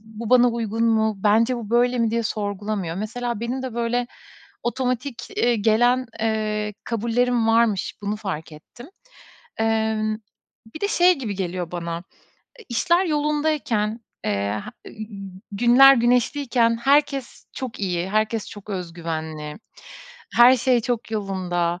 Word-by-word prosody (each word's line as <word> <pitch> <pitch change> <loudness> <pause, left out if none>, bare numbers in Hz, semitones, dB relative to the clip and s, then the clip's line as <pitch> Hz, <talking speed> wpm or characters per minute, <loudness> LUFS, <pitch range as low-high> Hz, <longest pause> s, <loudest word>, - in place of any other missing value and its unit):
"Bu 220 +1 -8
bana 245 -1 +6
uygun 230 -1 -1
mu? 220 -1 +2
Bence 225 +4 +3
bu 220 -3 -7
böyle 245 +1 +3
mi?" 230 -1 +2
diye 230 +1 0
sorgulamıyor. 205 -4 -3
Mesela 230 +2 -3
benim 245 +3 -3
de 255 -3 -5
böyle 240 +1 0 0.6
otomatik, 250 +1 -2 0.2
ııı, 240 0 +3
gelen, 240 +4 +3
eee, 215 -1 -1
kabullerim 235 +1 +1
varmış, 225 -3 +2
bunu 205 +1 -2
fark 185 -7 -5
ettim. 240 - -13 0.7
Eee, 220 -1 +1 0.7
bir 310 - -7
de 405 - 0
şey 360 -4 +4
gibi 220 -7 -4
geliyor 180 -2 -3
bana, 170 -1 -4
ııı, 170 +1 -4 0.7
işler 345 +9 +2
yolundayken, 295 -8 0 0.2
eee, - - 0 0.5
he - - -10
ııı, 215 0 -8 0.5
günler 245 +6 +7
güneşliyken 240 0 +2
herkes 275 +1 +1
çok 255 -5 -6
iyi, 180 -1 -2
herkes 215 +1 0
çok 205 0 -10
öz 180 -3 -4
güvenli, 160 -2 -5 0.8
her 245 +2 +8
şey 250 0 +2
çok 240 -1 -3
yolunda, 180 -4 -2
225 Hz, 135 wpm, -23 LUFS, 205-245 Hz, 0.8 s, her